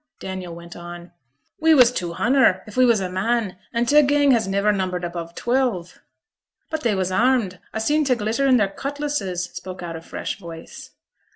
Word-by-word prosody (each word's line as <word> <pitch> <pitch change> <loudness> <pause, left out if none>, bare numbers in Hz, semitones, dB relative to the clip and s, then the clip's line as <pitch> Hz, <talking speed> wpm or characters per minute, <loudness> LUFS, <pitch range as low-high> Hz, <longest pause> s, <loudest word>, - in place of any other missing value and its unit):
Daniel 185 -3 -6
went 170 0 -11
on 175 0 -9 0.5
'We 320 0 +5
was 250 -3 +7
two 175 -8 -3
hunder, 230 -3 +3
if 210 - -12
we 255 0 +5
was 230 -4 +3
a 185 - -1
man; 195 +1 -1
an' 235 +1 0
t' 295 +5 +6
gang 285 0 +3
has 225 -5 +2
niver 200 +2 +2
numbered 185 -3 -2
above 170 -1 -5
twelve.' 235 -9 -1 0.7
'But 315 -1 -2
they 230 -6 +1
was 185 -1 -1
armed. 225 -4 +2
A - - -3
seen 300 +7 +2
t' 265 -3 +2
glitter 230 +5 0
on 255 -2 +5
their 205 -4 +3
cutlasses,' 275 -8 -3
spoke 185 -1 -7
out 170 -1 -5
a 165 - -7
fresh 165 - -5
voice. 165 -3 -10
205 Hz, 190 wpm, -22 LUFS, 180-255 Hz, 0.7 s, was